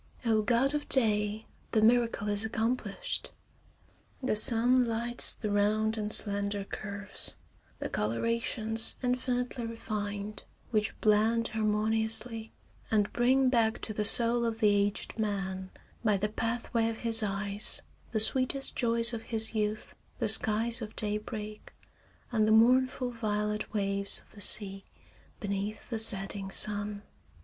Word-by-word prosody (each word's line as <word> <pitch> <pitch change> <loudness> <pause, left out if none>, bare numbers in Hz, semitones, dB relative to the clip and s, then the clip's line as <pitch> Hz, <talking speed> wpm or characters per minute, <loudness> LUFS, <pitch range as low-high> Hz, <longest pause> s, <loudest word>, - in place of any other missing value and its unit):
Oh, 220 -2 +2
god 245 +5 +1
of 295 0 -4
day! 215 -3 +2 0.3
The 220 - +2
miracle 230 -2 +2
is 205 0 0
accomplished. 230 - -3 0.9
The 255 - 0
sun 240 +4 +5
lights 235 +1 +4
the 210 -3 -5
round 215 +2 +1
and 210 -1 -4
slender 200 -1 0
curves, 200 0 -2 0.4
the - - -5
colorations 225 - +1
infinitely 250 -1 -2
refined, 210 -2 -6 0.3
which 215 -1 -1
blend 220 +2 +2
harmoniously, 220 +1 -1 0.4
and 210 -2 0
bring 260 +2 +2
back 230 -3 +1
to 215 - -4
the 210 - -2
soul 235 +2 +4
of 225 -1 -3
the 215 -2 +3
aged 205 +2 -1
man, 190 -3 -3 0.3
by 210 -3 +2
the 210 +2 -2
pathway 230 +1 -2
of 225 - -6
his 225 0 +5
eyes, 200 0 -2 0.3
the 220 - -1
sweetest 260 +4 +1
joys 235 -1 +1
of 225 - -5
his 220 -1 0
youth, 215 0 -3 0.2
the - - -1
skies 230 +2 +4
of 220 -1 -8
daybreak 210 0 -6 0.6
and 215 -3 +1
the - - +2
mournful 250 +3 +3
violet 210 -2 -3
waves 200 -1 0
of - - -25
the 205 - -14
sea 195 -2 +3 0.6
beneath 205 +1 -5
the 225 - -2
setting 195 -2 +2
sun. 205 +1 +1
220 Hz, 135 wpm, -29 LUFS, 210-230 Hz, 0.9 s, sun